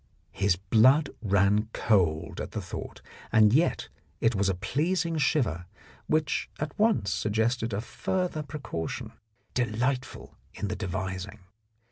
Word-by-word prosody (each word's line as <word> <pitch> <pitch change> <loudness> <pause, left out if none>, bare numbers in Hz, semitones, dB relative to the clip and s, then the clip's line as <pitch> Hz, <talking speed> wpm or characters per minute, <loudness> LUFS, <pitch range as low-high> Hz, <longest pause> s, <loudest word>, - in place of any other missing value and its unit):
His 100 -2 +2
blood 125 - +4
ran 100 +1 +2
cold 85 -7 +1
at - - -6
the - - -2
thought, - - -7 0.3
and 110 -1 +6
yet 160 +6 +2 0.3
it 115 - +3
was 100 -1 +1
a 95 - 0
pleasing 165 - 0
shiver 115 - +1 0.4
which 155 -1 0
at 150 -1 -3
once 210 - +2
suggested 110 +2 0
a 100 +1 -1
further 180 +5 -2
precaution, 140 - -5 0.4
delightful 125 +2 -2 0.2
in 100 - -3
the 105 - -2
devising. 95 +1 -4
110 Hz, 125 wpm, -28 LUFS, 100-145 Hz, 0.4 s, and